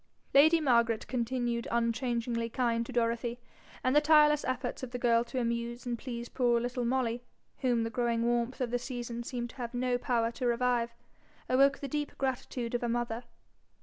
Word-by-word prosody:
Lady 315 +4 +7
Margaret 235 -6 +2
continued 240 -1 -1
unchangingly 235 0 0
kind 235 -1 0
to - - -7
Dorothy; 235 0 0 0.4
and 255 +2 +2
the 295 - +7
tireless 300 -1 +5
efforts 255 -1 -3
of 260 - -5
the 245 - -4
girl 235 -1 +3
to 255 +2 -3
amuse 235 0 -2
and 240 -1 -1
please 235 -1 -6
poor 240 -2 +2
little 245 +1 -2
Molly, 240 -1 0 0.4
whom 245 -3 +1
the 225 - -3
growing 235 0 0
warmth 240 +1 0
of 245 -2 -1
the 245 - 0
season 240 -1 -5
seemed 240 -1 -4
to - - -20
have 240 -1 -5
no 245 0 0
power 235 -2 +1
to 245 +1 -2
revive, 240 -1 +1 0.5
awoke 275 +2 +4
the 280 - -3
deep 295 +1 -3
gratitude 250 -2 -3
of 240 - 0
a 240 - -1
mother. 240 0 -2
240 Hz, 180 wpm, -31 LUFS, 235-255 Hz, 0.5 s, Lady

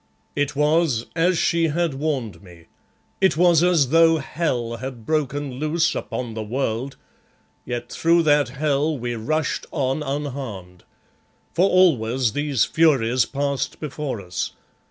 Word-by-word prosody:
It 145 0 -1
was 150 -5 +2
as 175 +1 +2
she 170 0 +2
had 165 0 0
warned 135 -6 -3
me. 85 -4 -16 0.6
It 190 -6 +3
was 170 -2 +5
as 170 -7 +3
though 165 +1 +5
hell 125 -6 -2
had 125 -2 -7
broken 145 -3 -2
loose 160 +2 +1
upon 120 -3 -4
the 110 - -4
world, 120 +3 -3 0.7
yet 120 0 -4
through 170 +1 +3
that 145 -4 +3
hell 145 +3 0
we 120 -1 -3
rushed 155 +7 -2
on 135 -1 -1
unharmed. 130 -11 -5 0.7
For 185 +4 +3
always 130 - +3
these 145 -4 +1
furies 130 -7 +3
passed 140 -1 -2
before 150 -5 -4
us. 90 -2 -4
140 Hz, 135 wpm, -22 LUFS, 120-160 Hz, 0.7 s, was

